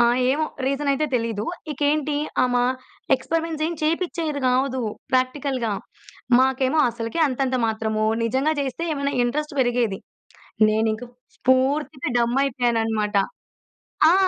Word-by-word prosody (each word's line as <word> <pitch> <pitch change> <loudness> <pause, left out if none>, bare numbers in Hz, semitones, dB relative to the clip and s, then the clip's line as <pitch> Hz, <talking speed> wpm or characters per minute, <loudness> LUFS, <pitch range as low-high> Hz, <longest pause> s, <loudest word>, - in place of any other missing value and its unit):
ఆహ్, 240 +1 +4
ఏమో 300 +4 +1 0.2
రీజన‌యితే 280 +2 +1
తెలీదు. 225 -3 -2 0.3
ఇకేంటి 295 +1 0 0.3
ఆమ, 250 -1 0 0.6
ఎక్స్‌పరిమెంట్స్ 320 +3 -2
ఏం 340 - -2
చేపించేది 325 -2 -1
గాదు 260 +1 +1 0.3
ప్రాక్టికల్‌గా. 255 -2 0 0.7
మాకేమో 265 +3 +2
అసలుకే 230 +7 -4
అంతంత 260 0 0
మాత్రము. 220 -1 -1 0.2
నిజంగా 265 +7 +1
చేస్తే 275 +3 -3
ఏమన్నా 280 0 -1
ఇంట్రెస్ట్ 300 +5 -2
పెరిగేది. 240 -5 +1 0.7
నేనింకా 220 +2 0 0.4
పూర్తిగా 270 +1 +2
డమ్ 235 +2 +1
అయిపోయానన్నమాట. 225 -5 0 1.0
ఆ! - - +5
260 Hz, 105 wpm, -23 LUFS, 235-290 Hz, 1.0 s, ఆ